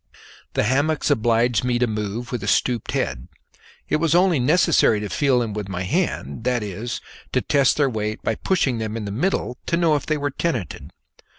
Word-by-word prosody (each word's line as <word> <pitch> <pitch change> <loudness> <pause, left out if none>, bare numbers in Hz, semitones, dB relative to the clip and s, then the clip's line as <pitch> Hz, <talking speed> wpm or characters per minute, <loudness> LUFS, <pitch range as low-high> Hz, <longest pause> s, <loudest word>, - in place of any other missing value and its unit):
The - - +1
hammocks 145 +7 +1
obliged 120 -2 +2
me 125 -1 +1
to 125 - +2
move 110 +1 -4
with 125 -4 -3
a 100 - -5
stooped 120 -1 +1
head; 65 -1 -2 0.6
it - - +1
was 165 +1 +1
only 180 -4 +4
necessary 150 - +3
to 105 -1 -4
feel 130 +7 +2
them 115 -3 -1
with 105 -2 -5
my 90 -1 -3
hand 90 - -2
that 125 -2 0
is, 105 +4 -5 0.3
to - - +3
test 140 -2 +2
their 145 -2 +3
weight 110 -3 -3
by - - +1
pushing 135 - 0
them 110 0 -3
in 110 - -4
the 100 - -4
middle 125 - -1
to 170 - +1
know 165 -3 +3
if 145 - -3
they 155 - +1
were 145 0 -2
tenanted. 130 - -3
120 Hz, 200 wpm, -22 LUFS, 105-145 Hz, 0.6 s, only